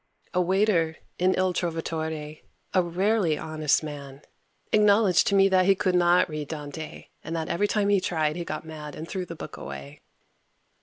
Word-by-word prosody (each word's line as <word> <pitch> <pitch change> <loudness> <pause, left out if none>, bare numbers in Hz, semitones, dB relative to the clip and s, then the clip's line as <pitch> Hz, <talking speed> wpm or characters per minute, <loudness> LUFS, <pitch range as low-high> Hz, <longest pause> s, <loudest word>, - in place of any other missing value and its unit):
A 180 - +2
waiter, 180 -3 +2 0.2
in 185 +1 +3
Il 185 -1 +2
Trovatore, 160 -3 -3 0.3
a 185 - +5
rarely 180 -1 +1
honest 155 -1 0
man, 140 -2 -8 0.5
acknowledged 205 -3 +5
to 200 - +2
me 195 0 +6
that 185 -1 +3
he 195 - +6
could 185 -1 0
not 175 0 +4
read 155 -3 -5
Dante, 150 0 -7
and 165 - -4
that 160 -1 -3
every 205 +5 +1
time 205 -1 +1
he 200 -2 +3
tried 155 -4 0
he 175 - -3
got 170 - -5
mad 150 -2 -8
and 160 - -7
threw 185 -1 -4
the 170 - -7
book - - -8
away. 70 +1 -8
170 Hz, 175 wpm, -26 LUFS, 155-185 Hz, 0.5 s, me